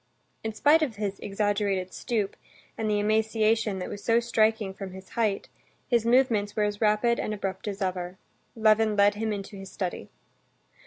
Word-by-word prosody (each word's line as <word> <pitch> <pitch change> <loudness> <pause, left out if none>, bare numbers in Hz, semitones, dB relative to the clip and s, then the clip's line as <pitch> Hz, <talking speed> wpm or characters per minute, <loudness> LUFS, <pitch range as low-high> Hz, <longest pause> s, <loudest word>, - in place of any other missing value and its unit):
In 220 - -2
spite 300 +7 +5
of 270 -8 -1
his 200 -1 -3
exaggerated 200 -2 -1
stoop, 215 -5 -2 0.4
and 220 -1 -2
the 210 -1 +2
emaciation 220 0 +1
that 180 - -4
was 205 - -7
so 230 0 +4
striking 220 -3 +1
from 190 -1 -7
his 190 0 -11
height, 215 -4 -1 0.4
his 235 -3 +2
movements 235 -5 +3
were 215 - +1
as 205 0 -2
rapid 220 +2 +3
and 215 - -2
abrupt 195 0 -4
as 200 0 -3
ever. 180 -1 -3 0.4
Levin 215 -1 +3
led 205 0 +5
him 220 +1 -2
into 200 0 -5
his 195 0 -9
study. 185 -3 -4
210 Hz, 170 wpm, -27 LUFS, 195-220 Hz, 0.4 s, spite